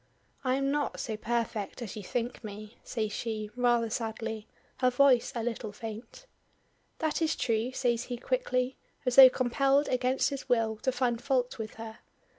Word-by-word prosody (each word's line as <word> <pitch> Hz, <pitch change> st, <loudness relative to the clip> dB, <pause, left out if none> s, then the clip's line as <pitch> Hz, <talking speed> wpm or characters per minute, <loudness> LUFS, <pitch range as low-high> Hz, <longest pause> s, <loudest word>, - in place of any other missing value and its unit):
"I 255 Hz, -1 st, +2 dB
am 275 Hz, 0 st, 0 dB
not 290 Hz, 0 st, -1 dB
so 220 Hz, -, -3 dB
perfect 225 Hz, -2 st, -2 dB
as 235 Hz, -6 st, -6 dB
you 215 Hz, -, -5 dB
think 240 Hz, +5 st, -3 dB
me," 215 Hz, +1 st, -9 dB
says 215 Hz, -3 st, -2 dB
she, 215 Hz, -1 st, -4 dB
rather 240 Hz, -2 st, +2 dB
sadly 225 Hz, -1 st, -4 dB, 0.3 s
her 255 Hz, -1 st, +3 dB
voice 250 Hz, -1 st, +4 dB
a 230 Hz, -, -2 dB
little 225 Hz, -2 st, -3 dB
faint. 225 Hz, -, -8 dB, 0.7 s
"That 315 Hz, 0 st, -1 dB
is 320 Hz, -1 st, +2 dB
true," 230 Hz, +1 st, 0 dB
says 245 Hz, -2 st, 0 dB
he 245 Hz, -, -4 dB
quickly, 260 Hz, -, -1 dB, 0.3 s
as 250 Hz, -1 st, +1 dB
though 265 Hz, -1 st, +12 dB
compelled 275 Hz, +3 st, +2 dB
against 255 Hz, +2 st, +1 dB
his 275 Hz, -1 st, -6 dB
will 225 Hz, -3 st, +2 dB
to 260 Hz, -, 0 dB
find 245 Hz, -2 st, 0 dB
fault 250 Hz, -3 st, 0 dB
with 215 Hz, -1 st, -5 dB
her. 225 Hz, 0 st, -8 dB
240 Hz, 170 wpm, -30 LUFS, 225-260 Hz, 0.7 s, though